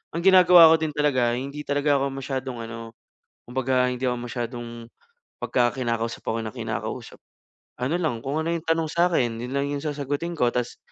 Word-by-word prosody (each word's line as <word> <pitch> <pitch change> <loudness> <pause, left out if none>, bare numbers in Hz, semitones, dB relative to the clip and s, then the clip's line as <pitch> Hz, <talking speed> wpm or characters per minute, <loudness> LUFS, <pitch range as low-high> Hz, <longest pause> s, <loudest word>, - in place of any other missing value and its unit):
ang 170 - -1
ginagawa 180 -3 +8
ko - - +7
din 155 -2 -2
talaga 130 -5 +2
hindi 140 +3 -6
talaga 145 0 +2
ako 140 - 0
masyadong 130 -2 -4
ano, 115 0 -8 0.5
kumbaga 130 0 +1
hindi 125 +1 -3
ako 125 - 0
masyadong, 120 -1 -4 0.7
pagka 120 -2 +1
kinakausap 115 -2 -2
ako 115 - -1
nang 110 - -4
kinakausap, - - -5 0.7
ano 135 +7 0
lang, 130 -9 -1
kung 140 +3 -1
ano 165 - -1
'yung 170 -1 -4
tanong 165 0 +2
sa'kin, 165 -10 +1
yun 125 +3 -5
lang 140 - 0
yung 140 - -3
sasagutin 145 +3 -3
ko. 120 -1 +2
Ta's, 125 -1 -2
135 Hz, 175 wpm, -24 LUFS, 120-150 Hz, 0.7 s, ginagawa